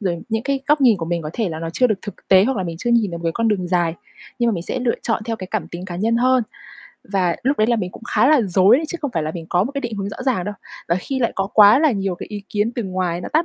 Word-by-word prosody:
rồi 175 Hz, -5 st, -2 dB
những 225 Hz, 0 st, -1 dB
cái 275 Hz, +1 st, -1 dB
góc 300 Hz, 0 st, +3 dB
nhìn 245 Hz, -6 st, +5 dB
của 165 Hz, -, -4 dB
mình 170 Hz, 0 st, -2 dB
có 150 Hz, -, -5 dB
thể 220 Hz, -1 st, -1 dB
là 160 Hz, -2 st, -5 dB
nó 165 Hz, 0 st, -4 dB
chưa 250 Hz, +9 st, +2 dB
được 215 Hz, -5 st, -1 dB
thực 205 Hz, -4 st, -10 dB
tế, 190 Hz, 0 st, +6 dB
hoặc 265 Hz, +2 st, 0 dB
là 190 Hz, -, -1 dB
mình 170 Hz, -2 st, -5 dB
chưa 240 Hz, -, -2 dB
nhìn 230 Hz, -4 st, +3 dB
được 170 Hz, -, -5 dB
một 170 Hz, -, -10 dB
cái 165 Hz, -, 0 dB
con 230 Hz, -1 st, +1 dB
đường 190 Hz, -4 st, -1 dB
dài. 175 Hz, -2 st, +1 dB, 0.4 s
Nhưng 240 Hz, -1 st, +2 dB
mà -, -, +2 dB
mình 170 Hz, -, -4 dB
sẽ 255 Hz, -, -3 dB
lựa 245 Hz, -2 st, +1 dB
chọn 225 Hz, -1 st, -1 dB
theo 225 Hz, 0 st, -3 dB
cái 185 Hz, -3 st, -7 dB
cảm 195 Hz, -7 st, -2 dB
tính 175 Hz, +2 st, -7 dB
cá 175 Hz, -2 st, -6 dB
nhân 225 Hz, +4 st, +1 dB
hơn, 255 Hz, +1 st, +3 dB, 0.6 s
và 185 Hz, -4 st, 0 dB
lúc 275 Hz, +3 st, +1 dB
đấy 215 Hz, -, +3 dB
là 235 Hz, 0 st, +2 dB
mình 185 Hz, -5 st, -3 dB
cũng -, -, -13 dB
khá -, -, +4 dB
là 305 Hz, -3 st, +5 dB
rối 195 Hz, +4 st, +4 dB
chứ 345 Hz, -, -5 dB
không 285 Hz, -, -1 dB
phải 165 Hz, -, 0 dB
là 155 Hz, -, -2 dB
mình 165 Hz, -2 st, -7 dB
có 180 Hz, +2 st, +2 dB
một 260 Hz, -, -5 dB
cái 280 Hz, -, -3 dB
định 235 Hz, -4 st, -4 dB
hướng 200 Hz, 0 st, -3 dB
rõ 200 Hz, -, -7 dB
ràng 255 Hz, -9 st, 0 dB
đâu. 205 Hz, -, -4 dB, 0.3 s
Và 170 Hz, -, +3 dB
khi 270 Hz, +7 st, -3 dB
lại 235 Hz, -3 st, 0 dB
có 195 Hz, -, -1 dB
quá 210 Hz, +3 st, +8 dB
là 310 Hz, 0 st, +4 dB
nhiều 195 Hz, -3 st, -2 dB
cái -, -, -8 dB
ý 205 Hz, -1 st, -6 dB
kiến 210 Hz, +3 st, -1 dB
từ 240 Hz, -, -3 dB
ngoài 185 Hz, -2 st, -2 dB
nó -, -, -6 dB
tác 315 Hz, +2 st, +3 dB
205 Hz, 335 wpm, -20 LUFS, 180-235 Hz, 0.6 s, quá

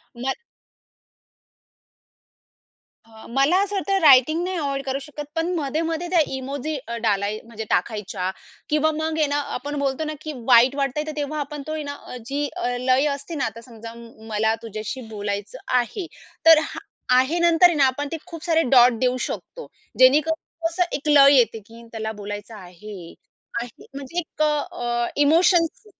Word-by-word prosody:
ना 255 Hz, +3 st, -2 dB, 2.7 s
हं, 220 Hz, -1 st, -14 dB
मला 275 Hz, +7 st, +3 dB
असं 405 Hz, 0 st, -4 dB
वाटत 395 Hz, 0 st, -3 dB
रायटिंग 310 Hz, +3 st, +6 dB
नाही 370 Hz, 0 st, -2 dB
अव्हॉइड 275 Hz, -3 st, -2 dB
करू 270 Hz, 0 st, -2 dB
शकत 295 Hz, +1 st, -8 dB
पण 325 Hz, +1 st, 0 dB
मध्ये-मध्ये 325 Hz, +3 st, -2 dB
त्या 360 Hz, -, +3 dB, 0.2 s
इमोजी 275 Hz, +3 st, -4 dB, 0.3 s
डालाय 205 Hz, 0 st, 0 dB
म्हणजे 225 Hz, -1 st, -7 dB
टाकायच्या, 190 Hz, -2 st, -1 dB, 0.4 s
किंवा 305 Hz, +1 st, +2 dB
मग 315 Hz, 0 st, -2 dB
आहे 310 Hz, -, +3 dB
ना 285 Hz, +1 st, 0 dB
आपण 290 Hz, +4 st, -4 dB
बोलतो 275 Hz, +2 st, -1 dB
ना, 310 Hz, -, -3 dB
की 310 Hz, -, -6 dB
वाईट 250 Hz, +2 st, +6 dB
वाटतंय 280 Hz, +1 st, -1 dB
तर -, -, -3 dB
तेव्हा 295 Hz, +1 st, -3 dB
आपण 295 Hz, 0 st, -5 dB
तो -, -, -4 dB
आहे 310 Hz, -, -3 dB
ना 285 Hz, 0 st, -5 dB
अ, 250 Hz, -, -8 dB
जी 285 Hz, +3 st, -2 dB, 0.4 s
लय 260 Hz, +2 st, +3 dB
असते 285 Hz, +4 st, -8 dB
ना 275 Hz, -, -1 dB
आता 225 Hz, +1 st, -6 dB
समजा 230 Hz, -2 st, -11 dB
म्म 230 Hz, -1 st, -14 dB
मला 220 Hz, +1 st, +1 dB
तुझ्याशी 220 Hz, +3 st, -6 dB
बोलायचं 205 Hz, -1 st, -4 dB, 0.2 s
आहे. 295 Hz, -, -4 dB, 0.4 s
तर 325 Hz, -1 st, +9 dB
हां -, -, -8 dB, 0.3 s
आहे 290 Hz, +7 st, +1 dB
नंतर 340 Hz, +1 st, +5 dB
आहे 345 Hz, -, -1 dB
ना 280 Hz, -, +5 dB
आपण 265 Hz, +3 st, -1 dB
ते 330 Hz, -, -3 dB
खूप 335 Hz, -2 st, -9 dB
सारे 325 Hz, -2 st, +2 dB
डॉट 245 Hz, -2 st, +6 dB
देऊ 255 Hz, 0 st, +1 dB
शकतो 485 Hz, -, -6 dB, 0.3 s
जेणेकरून 295 Hz, +5 st, +5 dB, 0.3 s
कसं 335 Hz, +2 st, 0 dB
एक 295 Hz, -, -5 dB
लय 280 Hz, -1 st, +7 dB
येते, 230 Hz, -2 st, +2 dB
की 230 Hz, +3 st, -15 dB
त्याला 220 Hz, -1 st, -4 dB
बोलायचं 205 Hz, +2 st, -7 dB
आहे. 180 Hz, -1 st, -11 dB, 0.5 s
आहे 240 Hz, -1 st, -11 dB
म्हणजे 280 Hz, +6 st, -4 dB, 0.2 s
क -, -, -3 dB, 0.3 s
अ, 240 Hz, 0 st, -2 dB
इमोशन्स 335 Hz, +5 st, +3 dB
275 Hz, 165 wpm, -23 LUFS, 230-310 Hz, 2.7 s, तर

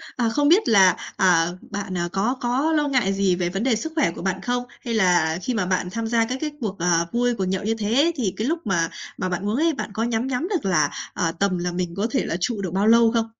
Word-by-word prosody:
à, 235 Hz, -2 st, +1 dB
không 290 Hz, +5 st, +1 dB
biết 365 Hz, +8 st, +4 dB
là, 190 Hz, -5 st, +6 dB, 0.2 s
ờ, 175 Hz, -1 st, +2 dB
bạn 200 Hz, -2 st, -4 dB, 0.2 s
có 215 Hz, +7 st, 0 dB
có 255 Hz, +6 st, +1 dB
lo 300 Hz, -2 st, +2 dB
ngại 250 Hz, -8 st, +1 dB
gì 195 Hz, -2 st, +2 dB
về 175 Hz, -1 st, -1 dB
vấn 195 Hz, +4 st, -3 dB
đề 255 Hz, -3 st, +2 dB
sức 320 Hz, +9 st, -4 dB
khỏe 300 Hz, -, +2 dB
của -, -, -9 dB
bạn 190 Hz, 0 st, -2 dB
không? 245 Hz, +4 st, -1 dB, 0.2 s
Hay 235 Hz, -, -4 dB
là 175 Hz, -6 st, +2 dB
khi 250 Hz, -, -2 dB
mà 215 Hz, -5 st, 0 dB
bạn 180 Hz, 0 st, -1 dB
tham 230 Hz, +2 st, -3 dB
gia 230 Hz, 0 st, +2 dB
các 250 Hz, +3 st, -3 dB
cái 305 Hz, -1 st, -2 dB
cuộc, 205 Hz, -4 st, -4 dB
ờ, 170 Hz, -1 st, +2 dB
vui, 245 Hz, 0 st, +1 dB
cuộc 195 Hz, -4 st, -2 dB
nhậu 190 Hz, +1 st, -2 dB
như 220 Hz, +2 st, 0 dB
thế 230 Hz, +10 st, +2 dB
thì 220 Hz, -, -1 dB
cái 220 Hz, -, -1 dB
lúc 330 Hz, +3 st, 0 dB
mà 170 Hz, -4 st, +1 dB, 0.3 s
mà 185 Hz, -, -2 dB
bạn 180 Hz, +2 st, -3 dB
uống 215 Hz, -, 0 dB
ấy 325 Hz, +4 st, +2 dB
bạn 275 Hz, -, -5 dB
có 220 Hz, -, -1 dB
nhắm 235 Hz, +1 st, -1 dB
nhắm 270 Hz, +6 st, -2 dB
được 365 Hz, -, -2 dB
là, 155 Hz, -7 st, +2 dB, 0.2 s
ờ, 165 Hz, -2 st, 0 dB
tầm 185 Hz, +2 st, 0 dB
là 175 Hz, 0 st, -2 dB
mình 175 Hz, -1 st, -3 dB
có 205 Hz, +3 st, 0 dB
thể 265 Hz, -, 0 dB
là 165 Hz, -, -2 dB
trụ 210 Hz, +3 st, -1 dB
được 185 Hz, -3 st, -3 dB
bao 195 Hz, +2 st, +1 dB
lâu 230 Hz, 0 st, +6 dB
không? 230 Hz, -1 st, +1 dB
210 Hz, 275 wpm, -23 LUFS, 185-245 Hz, 0.3 s, là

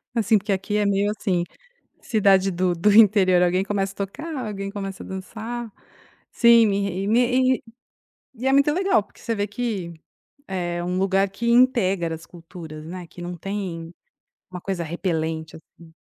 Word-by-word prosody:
Assim, 225 Hz, -2 st, +3 dB
porque 205 Hz, +1 st, -3 dB
aqui 195 Hz, +2 st, -1 dB
é 210 Hz, -, +2 dB
meio 200 Hz, +1 st, +1 dB
assim, 180 Hz, -6 st, 0 dB, 0.6 s
cidade 195 Hz, -3 st, +3 dB
do 180 Hz, 0 st, 0 dB
do 175 Hz, +5 st, +2 dB
interior, 200 Hz, -4 st, +6 dB
alguém 180 Hz, +1 st, +2 dB
começa 195 Hz, -1 st, -1 dB
a -, -, -28 dB
tocar, 310 Hz, -, -8 dB
alguém 195 Hz, -1 st, -5 dB
começa 195 Hz, -2 st, -6 dB
a -, -, -10 dB
dançar. 225 Hz, +5 st, -6 dB, 0.6 s
Sim, 235 Hz, -1 st, +6 dB
me 200 Hz, 0 st, 0 dB
re 195 Hz, -1 st, -2 dB
e -, -, -2 dB
me 240 Hz, +3 st, +4 dB, 0.3 s
re -, -, -7 dB, 0.7 s
e 245 Hz, +3 st, -7 dB
é 270 Hz, -, +3 dB
muito 280 Hz, +2 st, +4 dB
legal, 375 Hz, -, +2 dB
porque -, -, -22 dB
você 230 Hz, -1 st, -2 dB
vê 205 Hz, 0 st, -1 dB
que 205 Hz, -6 st, -4 dB, 0.6 s
é 175 Hz, -2 st, -3 dB
um 180 Hz, +1 st, -2 dB
lugar 195 Hz, +1 st, +2 dB
que 235 Hz, +4 st, -3 dB
integra 195 Hz, -9 st, +3 dB
as 165 Hz, -, -14 dB
culturas, 165 Hz, -3 st, -10 dB
né, 180 Hz, 0 st, -7 dB
que 175 Hz, -, -12 dB
não 175 Hz, 0 st, -5 dB
tem 175 Hz, -3 st, -5 dB, 0.6 s
uma 180 Hz, -1 st, -7 dB
coisa 180 Hz, -3 st, -3 dB
repelente, 160 Hz, -2 st, -3 dB
assim. 160 Hz, 0 st, -18 dB
195 Hz, 175 wpm, -23 LUFS, 175-215 Hz, 0.7 s, interior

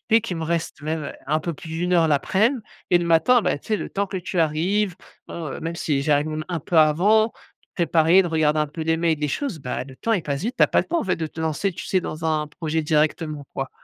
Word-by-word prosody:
fait, 225 Hz, +1 st, +6 dB
qu'il 190 Hz, -7 st, -4 dB
me -, -, -3 dB
reste 165 Hz, -1 st, -2 dB
même, 155 Hz, 0 st, -2 dB
heu, -, -, -5 dB
un 155 Hz, +3 st, +1 dB
peu 170 Hz, +2 st, -3 dB
plus 175 Hz, +1 st, -11 dB
d' 160 Hz, +1 st, -4 dB
1 180 Hz, 0 st, 0 dB
heure 165 Hz, -2 st, +4 dB
l'aprèm 210 Hz, -, +2 dB, 0.3 s
et 175 Hz, -, +6 dB
le 175 Hz, -, -2 dB
matin, 225 Hz, +9 st, +4 dB
bah, 180 Hz, -6 st, 0 dB
tu -, -, -18 dB
sais? 215 Hz, -, +2 dB
Le -, -, -6 dB
temps 200 Hz, 0 st, -1 dB
que 195 Hz, -, -5 dB
tu 180 Hz, 0 st, -4 dB
arrives, 175 Hz, +6 st, +1 dB, 0.3 s
bon, 165 Hz, -2 st, -5 dB
heu, -, -, -7 dB
même 165 Hz, +1 st, -4 dB
si 145 Hz, -4 st, 0 dB
j'arrive 150 Hz, +1 st, +2 dB
même 155 Hz, 0 st, -4 dB
un 175 Hz, -3 st, -2 dB
peu 165 Hz, +3 st, +1 dB
avant 200 Hz, +9 st, +4 dB, 0.4 s
préparer, 170 Hz, +1 st, +4 dB
de 175 Hz, -, -3 dB
regarder 155 Hz, -2 st, +2 dB
un 150 Hz, -, +1 dB
peu 155 Hz, +3 st, -8 dB
les 160 Hz, +1 st, +1 dB
mails, 165 Hz, -2 st, +1 dB
les 150 Hz, -, 0 dB
choses. 235 Hz, -, -3 dB
Bah, 125 Hz, -1 st, -4 dB
le 130 Hz, 0 st, -13 dB
temps 230 Hz, -, -1 dB
il 195 Hz, -6 st, +1 dB
passe 140 Hz, -2 st, -3 dB
vite, 240 Hz, +5 st, -3 dB
tu -, -, +5 dB
as -, -, +2 dB
pas -, -, +2 dB
le -, -, -5 dB
temps 340 Hz, -, 0 dB
en -, -, -3 dB
fait 185 Hz, -, 0 dB
de 160 Hz, -, -3 dB
te 160 Hz, -, -9 dB
lancer, 160 Hz, +5 st, -1 dB
tu 170 Hz, -, -7 dB
sais? 185 Hz, -, +1 dB
Dans 160 Hz, -2 st, -6 dB
un 155 Hz, -1 st, 0 dB
projet 160 Hz, +1 st, -2 dB
directement, 155 Hz, -1 st, 0 dB
quoi. 135 Hz, 0 st, -3 dB
165 Hz, 280 wpm, -23 LUFS, 155-185 Hz, 0.4 s, fait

